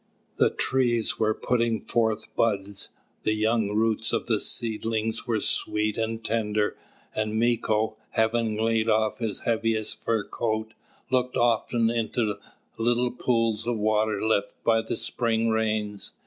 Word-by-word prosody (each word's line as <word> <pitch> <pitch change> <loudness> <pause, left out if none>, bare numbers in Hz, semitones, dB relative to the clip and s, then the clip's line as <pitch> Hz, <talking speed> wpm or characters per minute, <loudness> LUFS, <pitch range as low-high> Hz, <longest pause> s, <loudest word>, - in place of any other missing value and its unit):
The - - +4
trees 120 -4 +1
were 110 -1 +2
putting 115 -3 0
forth 110 -2 +1
buds, 100 -3 0 0.3
the 110 - +1
young 110 0 +1
roots 110 +1 +1
of - - 0
the 110 -3 +1
seedlings 110 +1 -1
were 115 -2 +1
sweet 105 +1 0
and 115 0 -3
tender, 105 -2 0 0.4
and 110 0 -1
Mīko, 110 -2 +1
having 110 -1 +1
laid 115 0 +1
off 110 +1 +2
his 110 -3 -3
heaviest 115 -2 -1
fur 115 -2 0
coat, 110 +1 -2 0.4
looked 125 -1 +1
often 115 -1 +2
in 115 -2 -1 0.7
little 120 +2 +2
pools 115 -3 0
of 120 -1 0
water 110 0 +1
left 100 -2 +1
by 115 -1 +3
the 110 0 -3
spring 115 -1 0
rains. 110 -2 -1
110 Hz, 135 wpm, -26 LUFS, 110-115 Hz, 0.7 s, The